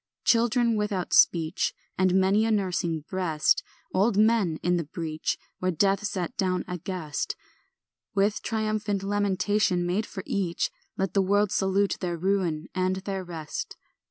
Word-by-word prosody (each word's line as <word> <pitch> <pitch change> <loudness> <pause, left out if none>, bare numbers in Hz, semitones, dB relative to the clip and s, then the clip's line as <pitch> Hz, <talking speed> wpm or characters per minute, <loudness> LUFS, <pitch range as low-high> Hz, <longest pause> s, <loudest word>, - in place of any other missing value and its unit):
Children 235 0 +3
without 205 -3 -2
speech, 165 -2 +3 0.2
And 185 0 +2
many 190 +3 +4
a 225 - +1
nursing 180 -6 0
breast; 165 -6 +1 0.3
Old 200 +2 +2
men 215 -7 +3
in 180 0 +2
the 170 - -1
breach, 155 0 -3 0.2
Where 185 - 0
death 195 +3 +2
sat 190 +2 -3
down 185 -3 0
a 180 0 -4
guest; 165 -4 -3 0.8
With 200 +1 +2
triumphant 215 -2 -1
lamentation 205 -2 +1
made 190 +5 0
for 190 - -7
each, 180 -4 -1 0.3
Let 190 0 -1
the 195 - +4
world 205 +1 +2
salute 195 0 +1
their 175 -2 -2
ruin 175 -3 0
and 185 0 +1
their 190 0 -4
rest. 165 -4 -6
190 Hz, 145 wpm, -27 LUFS, 175-205 Hz, 0.8 s, many